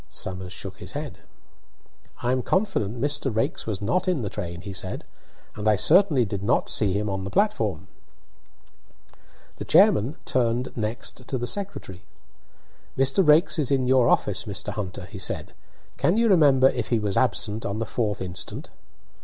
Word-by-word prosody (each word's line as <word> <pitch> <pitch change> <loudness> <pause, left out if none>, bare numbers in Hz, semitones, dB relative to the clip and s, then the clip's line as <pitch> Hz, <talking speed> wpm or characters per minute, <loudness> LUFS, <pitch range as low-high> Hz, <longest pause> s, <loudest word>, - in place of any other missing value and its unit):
Somers 95 -1 -6
shook 95 0 -6
his 90 0 -9
head. 145 0 -6 1.0
"I 120 - +1
am 130 0 +1
confident 125 - -1
Mr. 145 0 0
Raikes 110 0 -2
was 105 -2 -3
not 180 - 0
in 175 -9 0
the 100 - -4
train," 85 0 -6
he 100 +1 -7
said, 95 0 -4 0.5
"and 105 0 -3
I 105 - +5
certainly 150 - +5
did 100 -1 -4
not 110 +4 +1
see 105 -3 +2
him 105 +3 -1
on 95 -1 -3
the 100 - -5
platform." 105 - 0 1.7
The - - -5
chairman 115 +9 +4
turned 120 0 0
next 115 +3 -4
to 130 - -2
the 120 - -3
secretary. 155 - -5 0.9
"Mr. 135 +8 +3
Raikes 160 +2 +4
is 145 - 0
in 135 -2 +1
your 125 -1 +4
office, - - +1
Mr. - - -2
Hunter," 100 -4 -5
he - - -10
said. - - -2 0.4
"Can 180 - +2
you 230 0 +3
remember 140 -8 +5
if 120 -4 -3
he 120 - +2
was 105 -3 -2
absent 115 -3 0
on 100 - -3
the 115 - -2
4th 105 -2 -2
instant?" 90 -1 -4
115 Hz, 170 wpm, -24 LUFS, 100-140 Hz, 1.7 s, I